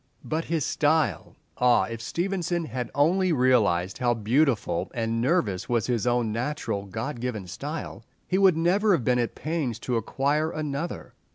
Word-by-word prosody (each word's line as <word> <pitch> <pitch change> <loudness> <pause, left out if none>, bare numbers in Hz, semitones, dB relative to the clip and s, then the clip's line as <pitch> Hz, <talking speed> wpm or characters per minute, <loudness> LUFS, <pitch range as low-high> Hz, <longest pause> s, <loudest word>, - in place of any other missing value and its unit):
But 160 +1 -2
his 160 -4 -1
style! 155 0 +1 0.2
Ah, 125 -1 +4
if 115 -1 -5
Stevenson 175 +3 -2
had 125 -2 -4
only 180 +6 +3
realized 110 - +2
how 120 -1 +2
beautiful 115 - +1
and 115 0 -1
nervous 120 - 0
was 120 -4 +1
his 120 -2 -1
own 120 -2 +1
natural 115 -4 -3
God 115 +7 -4
given 115 -5 -3
style, 140 - -6 0.2
he 185 - +1
would 190 -4 +5
never 195 +5 +3
have 155 -9 +1
been 125 +1 +2
at 120 - -1
pains 155 -8 -2
to 125 -2 -1
acquire 140 +7 0
another! 155 +1 -4
130 Hz, 160 wpm, -26 LUFS, 115-160 Hz, 0.2 s, would